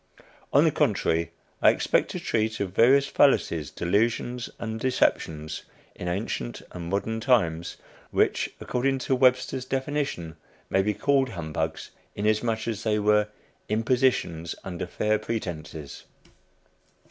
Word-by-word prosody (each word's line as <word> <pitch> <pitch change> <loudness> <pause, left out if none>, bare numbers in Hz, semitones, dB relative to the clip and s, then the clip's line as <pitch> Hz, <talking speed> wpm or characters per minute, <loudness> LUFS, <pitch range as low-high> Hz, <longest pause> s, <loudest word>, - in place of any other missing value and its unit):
On - - +6
the - - +4
contrary, 80 0 +1 0.3
I - - +7
expect - - +2
to - - -4
treat 110 0 -1
of 95 -3 -2
various 135 +6 +5
fallacies, 85 - +2
delusions, 115 +6 0
and 110 0 -4
deceptions 80 -11 0 0.3
in 90 - -6
ancient 90 - -3
and 85 -1 -6
modern 110 +4 -1
times, 85 -9 +1 0.3
which, - - +1
according 135 +2 0
to 130 +1 0
Webster's 130 0 +2
definition, 130 - -3 0.3
may 95 - +4
be 105 +1 0
called 135 +4 +2
"humbugs," 80 -4 -4 0.2
inasmuch 110 +2 0
as 110 -3 -2
they 105 -1 +1
were 105 0 +3 0.4
"impositions 110 -7 +1
under 90 -2 -5
fair 105 +4 0
pretences." 80 -9 -5
110 Hz, 125 wpm, -26 LUFS, 85-125 Hz, 0.4 s, I